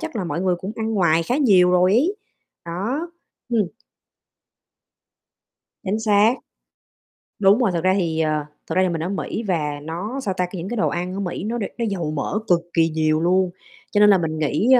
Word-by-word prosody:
chắc 320 -7 -5
là 195 - -2
mọi 170 0 -3
người 185 -1 +2
cũng 190 +4 -6
ăn 225 0 -2
ngoài 170 -4 +3
khá 245 +10 -1
nhiều 195 -11 +5
rồi 180 +1 +4
ấy, 310 - +2 0.5
đó, 230 - -3 0.4
ừm. 225 -5 +1 2.2
Chính 200 +2 -1
xác. 215 +1 +4 1.1
Đúng 200 +1 +5
rồi, 235 -6 +2
thực 170 -2 -2
ra 185 0 +4
thì, 165 -4 -1
ờ, 155 -2 0 0.2
thật - - -3
ra 185 - +4
thì 185 - +2
mình 165 -2 -2
ở 175 - -2
Mỹ, 200 +3 -3
và 150 -5 -1
nó, 190 - -4
sao 200 -8 -2
ta, 180 - +1
c 180 - -13
những 185 +1 -5
cái 240 - -3
đồ 220 - +2
ăn 180 +1 -3
ở 195 - -4
Mỹ 185 -2 -4
nó 225 +3 -2
đ 225 - -2
nó 235 - -1
dầu 170 -6 -2
mỡ 155 +7 -2
cực 175 -2 +4
kỳ 165 -1 +3
nhiều 155 0 +1
luôn, 185 +2 +2 0.4
cho 205 - +2
nên 210 0 +7
là 200 - +6
mình 160 -2 -2
nghĩ, 155 +7 0
185 Hz, 210 wpm, -22 LUFS, 170-215 Hz, 2.2 s, nên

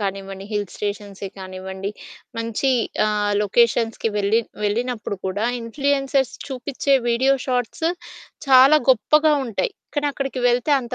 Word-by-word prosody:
కానివ్వండి 195 -1 -4
హిల్ 205 -1 -1
స్టేషన్సే 200 -1 -5
కానివ్వండి 190 +1 -6 0.5
మంచి 230 +4 -1 0.4
ఆహ్, 210 -1 0
లొకేషన్స్‌కి 225 +1 +2
వెళ్ళి 205 +3 +2 0.2
వెళ్ళినప్పుడు 220 0 -2
కూడా 195 +3 -2 0.2
ఇన్‌ఫ్లుయెన్సర్స్ 275 +2 0
చూపిచ్చే 270 +1 -1
వీడియో 260 +3 +3
షార్ట్స్ 250 +4 -1 0.6
చాలా 265 +3 +8
గొప్పగా 300 +5 +4
ఉంటాయి. 255 - -2 0.2
కానీ 290 -1 0
అక్కడికి 270 -2 -4
వెళ్తే 245 +4 +1
అంత 240 -2 -6
230 Hz, 115 wpm, -22 LUFS, 205-270 Hz, 0.6 s, చాలా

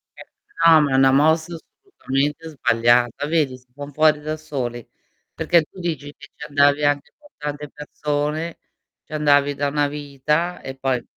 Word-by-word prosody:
Eh - - -11 0.4
no, 160 -2 +8
ma 145 -2 0
è - - +2
una 135 0 +5
mossa 160 +4 +2
assolutamente 160 - -4
sbagliata. 120 -1 +2
Vedi? 150 -6 0
Si 125 0 -26
fan 145 +1 -8
fuori 155 0 +3
da 155 +1 -4
soli, 130 -6 -5 0.5
perché 170 -1 +3
tu 185 - -16
dici 155 -4 -4
che 145 -1 -14
ci 150 - -8
andavi 145 0 +3
anche 145 -1 0
con 295 -1 -20
tante 150 0 -5
persone, 150 +2 -3 0.5
ci - - -14
andavi 145 -1 +3
da 145 0 -1
una 145 0 +1
vita 150 +4 -2
e 135 - -7
poi 130 -2 -1
145 Hz, 165 wpm, -21 LUFS, 140-155 Hz, 0.5 s, no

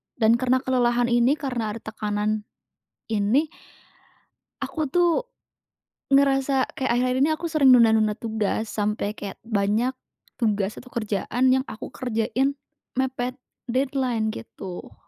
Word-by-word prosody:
dan 230 0 +3
karena 255 +1 +2
kelelahan 240 -1 +2
ini 240 +4 +4
karena 240 -7 -3
ada 230 - -8
tekanan 210 0 -2 0.6
ini, 225 +8 +2 1.2
aku 310 -2 -2
tuh 350 -1 +4 1.0
ngerasa 270 -1 +3
kayak 265 -2 0
akhir-akhir 255 +1 +1
ini - - +1
aku 320 +2 -5
sering 305 -4 +4
nunda-nunda 220 -3 +5
tugas 220 -1 -2
sampai 210 0 -1
kayak 200 -2 -7
banyak 220 +4 +1 0.4
tugas 210 -3 0
atau 250 - -11
kerjaan 235 +3 0
yang 260 +1 +3
aku 220 - -7
kerjain 250 +2 0 0.4
mepet 255 -1 -1 0.4
deadline 255 -3 0
gitu. 190 -5 -8
240 Hz, 120 wpm, -24 LUFS, 215-260 Hz, 1.2 s, nunda-nunda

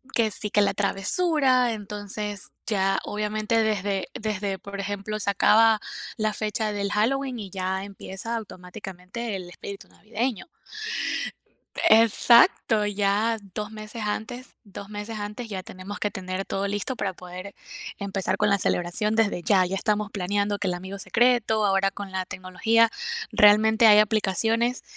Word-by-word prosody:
que 220 -2 +2
sí, 210 - -4
que 210 - +3
la 200 - +2
travesura. 255 - +2
Entonces, 205 0 -5 0.2
ya 195 -3 +1
obviamente 215 +2 0
desde 205 -3 -1
desde, 205 -3 -2
por 200 +1 -8
ejemplo, 205 +2 -4
se 200 - -1
acaba 220 +2 +5 0.4
la 215 -1 0
fecha 215 0 -2
del 200 0 -2
Halloween 255 +4 0
y 195 -4 -7
ya 190 0 -2
empieza 200 +3 -5
automáticamente 195 +1 -7
el 180 -2 -7
espíritu 195 +2 -9
navideño. 230 +2 -4 1.4
Exacto, 225 0 +5
ya 205 +2 +1 0.2
2 210 0 -4
meses 215 +1 -7
antes 240 +4 -5
2 200 0 -10
meses 210 +1 -6
antes 210 +3 -6
ya 190 -3 -5
tenemos 185 +3 -8
que 205 - 0
tener 185 0 -4
todo 195 +1 -2
listo 205 +6 -2
para 195 -3 -2
poder 180 +2 -9 0.4
empezar 195 -1 -1
con 210 - +2
la 200 - +3
celebración 185 +4 0
desde 205 -5 +1
ya. 190 0 +4
Ya 190 - -3
estamos 210 +1 0
planeando 200 +1 -1
que 200 - -2
el 180 - 0
amigo 190 +2 -7
secreto, 235 -1 +2
ahora 195 -1 +3
con 200 -1 -7
la 185 0 -2
tecnología 220 +6 +2 0.4
realmente 220 +2 +6
hay 210 -1 +8
aplicaciones 225 +4 +1
210 Hz, 145 wpm, -25 LUFS, 195-220 Hz, 1.4 s, hay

